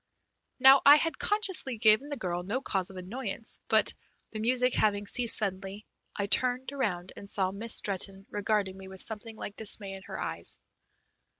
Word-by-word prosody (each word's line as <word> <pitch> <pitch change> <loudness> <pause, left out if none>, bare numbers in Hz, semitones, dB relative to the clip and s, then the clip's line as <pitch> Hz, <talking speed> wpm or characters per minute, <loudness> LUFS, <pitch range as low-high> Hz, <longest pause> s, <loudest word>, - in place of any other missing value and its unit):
Now 265 +1 +7
I 285 +1 +9
had 325 +1 -1
consciously 380 - +2
given 220 +5 +4
the 285 - -4
girl 175 -4 -3
no 205 +8 -3
cause 190 -8 -2
of 190 - -11
annoyance, 220 +4 -6
but, - - +3 0.4
the 215 - -6
music 250 +3 +1
having 205 -1 +1
ceased 235 +2 +1
suddenly, 195 0 -4 0.3
I 200 - -1
turned 250 +5 +1
around 190 -10 -3
and 200 - -10
saw 190 -2 +1
Miss 220 +4 0
Stretton 195 0 +1
regarding 205 -2 -1
me 190 0 -11
with 190 0 -5
something 220 0 -6
like 205 -2 -8
dismay 205 -2 +1
in 195 - -9
her - - -7
eyes. - - -2
215 Hz, 175 wpm, -29 LUFS, 195-250 Hz, 0.4 s, I